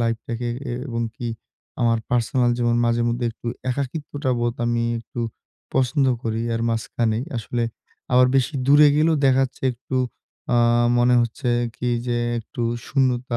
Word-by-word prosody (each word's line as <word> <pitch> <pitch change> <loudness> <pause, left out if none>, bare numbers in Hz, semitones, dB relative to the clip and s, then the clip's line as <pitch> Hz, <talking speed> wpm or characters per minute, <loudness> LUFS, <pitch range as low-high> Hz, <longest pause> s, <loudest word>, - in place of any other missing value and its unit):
লাইফটাকে 115 +1 -2 0.4
এবং 115 -2 -2
কি 120 - -5 0.5
আমার 115 -1 +3
পার্সোনাল 120 +1 +2
জীবন 120 -1 +2
মাঝে 115 0 +2
মধ্যে 120 +1 -1
একটু 120 - -13 0.2
একাকিত্বটা 140 +1 -3
বোধ 120 0 0
আমি 120 0 +1 0.2
একটু 120 +1 -7 0.5
পছন্দ 130 +1 +2 0.2
করি 115 0 -2
এর 115 - -1
মাঝখানেই, 115 +1 -1
আসলে 120 +1 -2 0.5
আবার 125 0 +6
বেশি 135 +4 +1
দূরে 145 +1 +7
গেলেও 160 +1 +3
দেখাচ্ছে 135 0 +1
একটু, 130 +2 -5 0.6
আ - - +4 0.4
মনে 125 +1 +4
হচ্ছে 120 +3 -3 0.3
কি 125 - -2 0.2
যে 120 -1 0 0.2
একটু 120 +2 -6 0.2
শূন্যতা 125 -3 +1
120 Hz, 140 wpm, -23 LUFS, 115-130 Hz, 0.6 s, দূরে